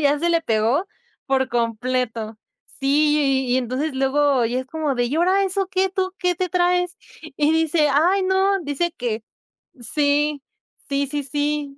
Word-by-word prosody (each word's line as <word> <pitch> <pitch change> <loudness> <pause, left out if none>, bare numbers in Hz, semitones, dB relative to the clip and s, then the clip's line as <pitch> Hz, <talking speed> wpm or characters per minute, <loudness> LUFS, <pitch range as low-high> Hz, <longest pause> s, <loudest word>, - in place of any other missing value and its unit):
ya 290 0 +3
se 340 +3 0
le 335 -1 +3
pegó 230 - +1 0.4
por 265 -1 +1
completo. 230 -2 -2 0.4
Sí 295 +2 +3 0.3
y 245 - 0
y - - +3
y - - +3
entonces 260 +4 -2
luego 270 -1 +2
y 235 +2 -1
es 260 0 -3
como 305 -1 -2
de, 245 -1 0
y 245 +4 -2
ahora 375 +4 +3
eso, 390 0 -1
¿qué 380 0 +1
tú, 375 0 -2
qué 360 -1 +1
te 365 +2 -2
traes? 360 +1 +1 0.4
Y 300 +1 +2
dice: 320 -1 +2
"Ay, 355 +7 +3
no. 380 +1 +2
Dice 295 +4 -2
que". 230 -2 -3 0.6
Sí. 290 +3 +1 0.5
Sí, 280 0 0
sí, 290 +1 -3
sí. 290 0 -2
290 Hz, 175 wpm, -22 LUFS, 260-345 Hz, 0.6 s, ya